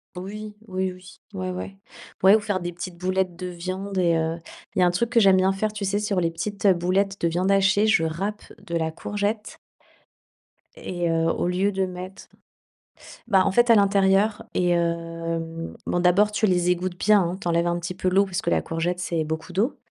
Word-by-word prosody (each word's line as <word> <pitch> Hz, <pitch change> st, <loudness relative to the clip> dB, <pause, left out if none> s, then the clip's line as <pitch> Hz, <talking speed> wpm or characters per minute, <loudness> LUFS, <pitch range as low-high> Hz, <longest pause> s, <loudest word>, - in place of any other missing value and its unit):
Oui, 210 Hz, +4 st, -7 dB
oui, 185 Hz, -1 st, -2 dB
oui, 185 Hz, -, -15 dB, 0.3 s
ouais 185 Hz, -1 st, -4 dB
ouais, 185 Hz, +2 st, -6 dB, 0.5 s
ouais, 195 Hz, +3 st, +7 dB
ou -, -, +3 dB
faire 205 Hz, -3 st, -2 dB
des 175 Hz, 0 st, -4 dB
petites 175 Hz, 0 st, -7 dB
boulettes 185 Hz, -1 st, -1 dB
de 180 Hz, +1 st, -6 dB
viande 185 Hz, +3 st, -5 dB
et 170 Hz, -2 st, +3 dB
heu. 160 Hz, +1 st, -1 dB, 0.4 s
Il -, -, 0 dB
y -, -, +5 dB
a -, -, +6 dB
un 175 Hz, -, +3 dB
truc 225 Hz, +7 st, 0 dB
que 245 Hz, -, +3 dB
j'aime 195 Hz, -3 st, +6 dB
bien 190 Hz, +1 st, +3 dB
faire, 210 Hz, +2 st, -2 dB
tu 205 Hz, -2 st, -4 dB
sais, 200 Hz, +2 st, 0 dB
sur 205 Hz, -2 st, 0 dB
les 165 Hz, -, +1 dB
petites 200 Hz, +5 st, -2 dB
boulettes 190 Hz, +2 st, +1 dB
de 170 Hz, -, +2 dB
viande 180 Hz, +3 st, 0 dB
hachée, 195 Hz, +2 st, +3 dB
je 215 Hz, -7 st, +3 dB
râpe 195 Hz, +7 st, -3 dB, 0.2 s
de 170 Hz, -4 st, -5 dB
la 160 Hz, -1 st, -1 dB
courgette 205 Hz, +5 st, -3 dB, 1.2 s
et, 175 Hz, -, -3 dB
heu, 165 Hz, 0 st, +1 dB
au 175 Hz, -, -1 dB
lieu 190 Hz, +3 st, +1 dB
de 190 Hz, 0 st, 0 dB
mettre 185 Hz, +1 st, -8 dB, 1.0 s
bah, 190 Hz, -4 st, +4 dB
en 195 Hz, -, +2 dB
fait, 240 Hz, +4 st, +3 dB
à 230 Hz, -, +8 dB
l'intérieur 200 Hz, +1 st, +3 dB
et, 180 Hz, -1 st, +1 dB
hem, 165 Hz, -1 st, -2 dB
bon, 175 Hz, -, 0 dB
d'abord, 190 Hz, +4 st, +4 dB
tu 210 Hz, -, +1 dB
les 180 Hz, -3 st, +2 dB
égouttes 180 Hz, 0 st, -1 dB
bien, 210 Hz, -1 st, +5 dB
hein, 175 Hz, +2 st, -2 dB
tu -, -, -4 dB
enlèves 170 Hz, 0 st, +2 dB
un 175 Hz, 0 st, 0 dB
petit 175 Hz, +1 st, -5 dB
peu 185 Hz, 0 st, -1 dB
l'eau, 195 Hz, +2 st, +3 dB
parce 190 Hz, -3 st, -3 dB
que 170 Hz, -, -1 dB
la -, -, +2 dB
courgette, 170 Hz, +2 st, -2 dB
c'est 170 Hz, -3 st, -1 dB
beaucoup 160 Hz, +3 st, -5 dB
d'eau 215 Hz, +9 st, 0 dB
185 Hz, 215 wpm, -24 LUFS, 175-200 Hz, 1.2 s, à